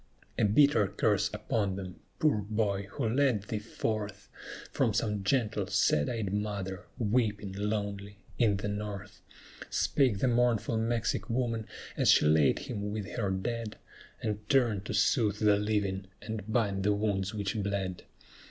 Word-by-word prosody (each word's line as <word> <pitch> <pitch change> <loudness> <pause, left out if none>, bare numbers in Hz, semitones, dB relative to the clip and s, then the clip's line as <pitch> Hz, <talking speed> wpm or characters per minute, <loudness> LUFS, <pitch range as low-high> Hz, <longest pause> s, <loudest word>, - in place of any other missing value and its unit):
"A - - +4
bitter 110 0 +4
curse - - +1
upon 100 -4 -1
them, 95 -1 -7 0.2
poor 155 -7 +3
boy, 100 -1 -1
who 130 -6 -1
led 125 -3 +2
thee 105 +1 -3
forth, 105 -1 -4 0.4
From - - +1
some 105 -3 0
gentle, 105 -3 +1
sad 100 -7 +2
eyed 110 -5 -2
mother, 100 -2 -3
weeping, 105 -3 0
lonely, 100 0 -3 0.2
in 105 -4 +3
the 100 - -3
North!" 105 -1 -5 0.5
Spake 130 -8 +2
the 115 - +1
mournful 120 -2 +2
Mexic 115 -2 -1
woman, 115 -2 -1 0.3
as - - +2
she - - +6
laid 75 -2 +4
him 100 0 -4
with 105 -1 -4
her 105 -5 -1
dead, 110 +4 -3 0.5
And 105 -1 -3
turned 115 -7 +2
to - - -4
soothe 105 -4 +2
the 105 -1 +4
living, 100 -2 -1
and 110 0 -6
bind 105 -4 +1
the 105 +2 +2
wounds 100 -1 -1
which 100 -1 -2
bled. 95 -2 -2
105 Hz, 150 wpm, -30 LUFS, 100-110 Hz, 0.5 s, she